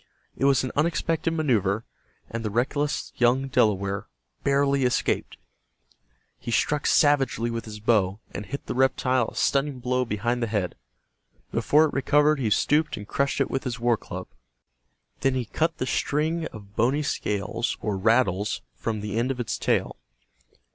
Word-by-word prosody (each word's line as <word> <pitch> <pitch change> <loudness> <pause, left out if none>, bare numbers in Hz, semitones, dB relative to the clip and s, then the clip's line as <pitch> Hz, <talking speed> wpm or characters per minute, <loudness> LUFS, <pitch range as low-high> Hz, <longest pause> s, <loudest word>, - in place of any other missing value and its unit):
It - - 0
was 140 -2 +4
an 130 - -3
unexpected 165 +1 +1
maneuver, 115 - +1 0.4
and 115 0 -5
the 110 - -1
reckless 140 +7 -1
young 125 +3 +3
Delaware 100 -4 +1 0.4
barely 140 0 +2
escaped. 125 - 0 1.0
He - - -7
struck 120 +7 +1
savagely 135 -5 +3
with 115 0 -4
his 105 -1 -8
bow, 105 -3 +2
and 105 - -6
hit 140 - -6
the - - -3
reptile 130 -1 +2
a - - -9
stunning 140 0 +1
blow 125 +1 0
behind 120 +2 -1
the 115 - 0
head. 105 -5 -1 0.8
Before 155 +2 +4
it 150 - -3
recovered 150 +2 +3
he 120 -5 0
stooped 150 +8 +2
and 105 - -8
crushed 140 +5 0
it - - 0
with 135 - -1
his 125 -3 -4
war 120 0 +3
club. 95 -3 -7 0.9
Then 135 -1 +1
he 125 -2 -1
cut 160 +9 -1
the - - -2
string 155 +5 0
of 100 -2 -13
bony 135 +6 +2
scales, 115 -3 -2
or 105 -2 -2
rattles, 105 -1 +1
from, 105 - -3
the 105 +1 -2
end 120 +3 0
of 135 -2 -3
its 120 - -2
tail. - - 0
125 Hz, 160 wpm, -25 LUFS, 105-140 Hz, 1.0 s, was